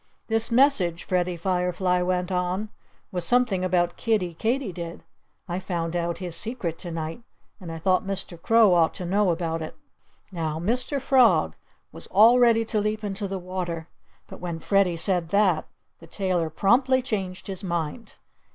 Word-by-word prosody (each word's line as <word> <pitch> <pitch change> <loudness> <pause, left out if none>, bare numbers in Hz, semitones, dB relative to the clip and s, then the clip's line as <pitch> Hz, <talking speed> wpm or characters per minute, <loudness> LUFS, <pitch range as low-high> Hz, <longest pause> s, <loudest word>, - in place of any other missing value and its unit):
"This 225 0 +1
message," 230 - +3
Freddie 180 -1 -1
Firefly 180 0 0
went 180 0 -1
on, 180 +3 -1 0.4
"was 180 -3 -2
something 245 -7 +2
about 175 -1 +1
Kiddie 205 -7 0
Katydid. 190 -6 -3 0.4
I 175 0 -3
found 175 -3 -3
out 170 -1 -1
his 175 -2 -3
secret 205 -5 -3
to 175 - -7
night. 165 +5 -5 0.4
And 175 -4 -8
I 165 - -5
thought 185 +2 +1
Mr. 190 -3 -4
Crow 225 -1 +5
ought 165 -2 +3
to 180 - -6
know 200 +2 +2
about 165 -1 -1
it." 155 - -6 0.6
Now, 160 -4 -3
Mr. 250 - -1
Frog 260 -3 +3 0.4
was - - -10
all 225 +5 +6
ready 230 -2 +4
to 215 -1 0
leap 215 +1 -2
into 200 0 -3
the 195 0 -4
water. 175 -3 -5 0.4
But - - -11
when 175 -2 -4
Freddie 185 0 +1
said 175 -1 +2
that, 190 -5 +2 0.3
the - - -14
tailor 180 -5 -1
promptly 255 - +2
changed 190 -6 -4
his 195 -1 -5
mind. 175 +5 -4
185 Hz, 160 wpm, -25 LUFS, 170-215 Hz, 0.6 s, all